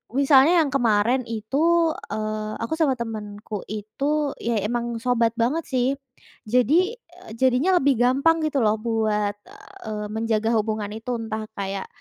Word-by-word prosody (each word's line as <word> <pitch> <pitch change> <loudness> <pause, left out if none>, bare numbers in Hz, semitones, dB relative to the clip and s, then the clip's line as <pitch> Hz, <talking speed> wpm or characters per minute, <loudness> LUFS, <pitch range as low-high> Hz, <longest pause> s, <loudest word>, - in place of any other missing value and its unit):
misalnya 280 +5 +5
yang 280 - -3
kemarin 240 -1 +2
itu, 305 +10 +1 0.2
eee, 215 0 -3
aku 230 - -3
sama 285 -5 +3
temanku 215 -2 -6
itu, 275 +8 -2
iya 230 -4 -1
emang 235 +2 -2
sobat 235 -2 +1
banget 250 +8 0
sih, 255 -1 +1 0.6
jadi, 300 - +3
eee, 350 - -17
jadinya 260 +9 +3
lebih 270 -3 +2
gampang 275 +7 +3
gitu 280 -5 0
loh 215 0 +2
buat, 215 -2 0 0.5
eee, 210 -1 -4
menjaga 220 0 0
hubungan 215 -1 -1
itu. 225 +3 -5
Entah 220 -1 -4
kayak 195 -1 -4
235 Hz, 140 wpm, -23 LUFS, 215-275 Hz, 0.6 s, misalnya